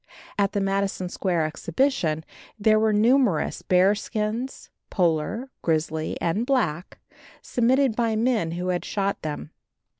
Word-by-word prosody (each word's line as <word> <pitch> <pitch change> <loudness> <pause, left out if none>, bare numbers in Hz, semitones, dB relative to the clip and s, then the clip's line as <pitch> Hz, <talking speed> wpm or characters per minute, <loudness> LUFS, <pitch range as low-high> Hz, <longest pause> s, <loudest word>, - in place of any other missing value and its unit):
At 200 -1 +1
the 205 - 0
Madison 195 -1 -1
Square 175 -4 0
exhibition 160 - 0 0.3
there 215 0 +4
were 220 0 +3
numerous 220 - +2
bear 185 +2 +4
skins, 220 +4 -4 0.2
polar, 185 - 0
grizzly 160 -1 -1
and 170 +7 0
black, 225 - -1 0.5
submitted 250 0 +2
by 230 -2 +1
men 220 -7 +1
who 180 +1 -3
had 180 -1 -1
shot 200 -1 -2
them. 150 0 -5
200 Hz, 125 wpm, -25 LUFS, 170-230 Hz, 0.5 s, there